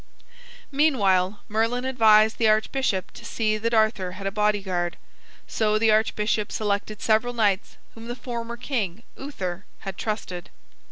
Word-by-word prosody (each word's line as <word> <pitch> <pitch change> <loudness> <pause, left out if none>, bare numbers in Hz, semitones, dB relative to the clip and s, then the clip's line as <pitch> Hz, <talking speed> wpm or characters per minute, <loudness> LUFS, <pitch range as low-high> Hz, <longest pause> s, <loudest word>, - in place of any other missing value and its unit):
Meanwhile, 205 -10 +2
Merlin 230 +4 0
advised 220 -4 +4
the 225 - +4
archbishop 215 -2 0
to - - -13
see 215 -2 -1
that 230 +2 -1
Arthur 215 -5 +2
had 195 +1 -8
a 195 - 0
bodyguard. 195 -4 0 0.5
So 215 -1 +1
the 220 0 +3
archbishop 215 -1 +1
selected 210 0 -2
several 220 +2 +2
knights 205 -4 0 0.2
whom 225 0 -11
the 240 - -4
former 235 -2 -5
king, 230 -6 -3
Uther, 195 -10 -5 0.2
had 195 -2 -7
trusted. 195 -5 -4
215 Hz, 135 wpm, -25 LUFS, 200-230 Hz, 0.5 s, advised